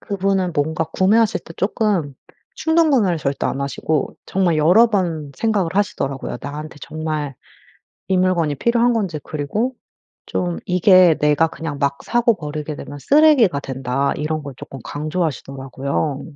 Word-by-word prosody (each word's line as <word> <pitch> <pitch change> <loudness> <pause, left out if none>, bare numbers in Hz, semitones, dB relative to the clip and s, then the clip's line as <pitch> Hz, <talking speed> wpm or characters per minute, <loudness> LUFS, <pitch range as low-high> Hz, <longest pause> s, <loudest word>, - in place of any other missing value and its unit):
그분은 195 -2 -1
뭔가 160 +2 0
구매하실 200 +7 +2
때 165 - -11
쪼끔 195 - 0 0.4
충동구매를 290 - +3
절대 140 -1 -2
안 135 - -2
하시고 140 +1 -2
정말 180 -4 +1
여러 180 +10 +6
번 165 -9 -1
생각을 205 -7 0
하시더라고요. 140 -12 -2
나한테 150 +2 -7
정말 155 -3 -4 0.7
이 190 -1 +2
물건이 175 -5 +1
필요한 235 - +2
건지 190 -9 -2
그리고 205 - -2 0.5
좀 175 -1 -2
"이게 180 -2 +5
내가 150 +2 +3
그냥 160 -3 -6
막 140 -1 0
사고 240 -2 +2
버리게 150 -1 -5
되면 145 0 -8
쓰레기가 275 - +4
된다." 135 0 -2
이런 155 +1 -2
걸 140 -2 -7
쪼끔 135 - -9
강조하시더라고요. 140 -3 -3
160 Hz, 325 characters per minute, -20 LUFS, 145-195 Hz, 0.7 s, 여러